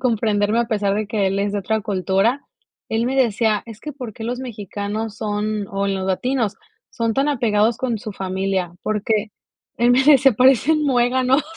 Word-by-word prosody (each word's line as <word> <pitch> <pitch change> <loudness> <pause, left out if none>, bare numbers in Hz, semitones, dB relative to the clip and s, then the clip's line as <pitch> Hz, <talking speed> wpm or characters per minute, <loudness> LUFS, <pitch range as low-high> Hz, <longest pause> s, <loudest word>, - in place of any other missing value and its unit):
comprenderme 220 -3 +1
a 235 - -1
pesar 205 -3 0
de 210 0 -2
que 210 -2 0
él 195 +1 0
es 200 0 -1
de 205 - -1
otra 220 +3 -1
cultura. 200 +7 0 0.4
Él 225 +1 0
me 265 +1 -1
decía: 220 -4 +2
"Es 225 -2 -11
que 300 - -6
¿por 250 -6 -7
qué 225 - -10
los 245 +2 -3
mexicanos 210 -2 -5
son, 210 -1 -2
o 200 0 -1
los 190 -1 -2
latinos 230 +2 -1 0.3
son 230 -2 -1
tan 275 +4 +1
apegados 225 -4 +2
con 240 -4 -1
su 215 0 -7
familia? 190 -2 -2
¿Por 210 -1 -1
qué?", 215 -1 0 0.5
él 240 +1 +3
me 255 +2 +5
dice: 275 -3 +6
"Parecen 265 +6 +4
muéganos". 255 +1 +2
220 Hz, 185 wpm, -21 LUFS, 205-250 Hz, 0.5 s, dice